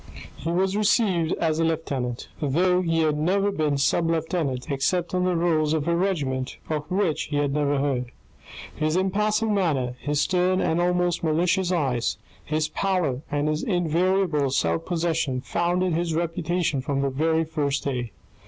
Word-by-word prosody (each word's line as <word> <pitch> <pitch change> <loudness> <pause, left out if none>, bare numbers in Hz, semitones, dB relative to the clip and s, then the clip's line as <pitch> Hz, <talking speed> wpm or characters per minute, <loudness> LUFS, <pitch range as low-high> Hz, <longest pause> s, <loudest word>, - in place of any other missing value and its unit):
He 165 - -5
was 190 +2 +1
received 200 -6 +2
as 160 -1 0
a - - +2
lieutenant, 140 -7 -2
though 180 +5 +2
he 165 -2 +1
had 155 -1 +1
never 195 +5 +2
been 150 -5 0
sub 165 +4 +2
lieutenant 160 -4 -1
except 170 +7 0
on 180 0 +1
the 180 -1 +1
rolls 160 -3 +2
of 155 0 -1
a 170 - +2
regiment 145 -8 -1
of 150 0 -3
which 185 -4 0
he 150 - -5
had 145 -1 +1
never 145 -1 +1
heard. 130 -3 -1 0.6
His 155 +1 0
impassive 210 +3 +1
manner, 145 -11 0
his 145 +1 -1
stern 185 +2 +2
and 165 -1 +1
almost 180 -1 +1
malicious 175 +3 +1
eyes, 130 -9 0 0.3
his 155 0 -1
pallor, 155 -6 -1
and 145 0 0
his 155 0 0
invariable 175 -4 +1
self 85 -10 0
possession, 165 -6 0
founded 175 +3 0
his 165 0 -1
reputation 165 -2 -1
from 135 +1 -1
the 140 -1 0
very 160 +4 +1
first 150 -3 -1
day. 125 -5 -3
160 Hz, 160 wpm, -25 LUFS, 145-180 Hz, 0.6 s, received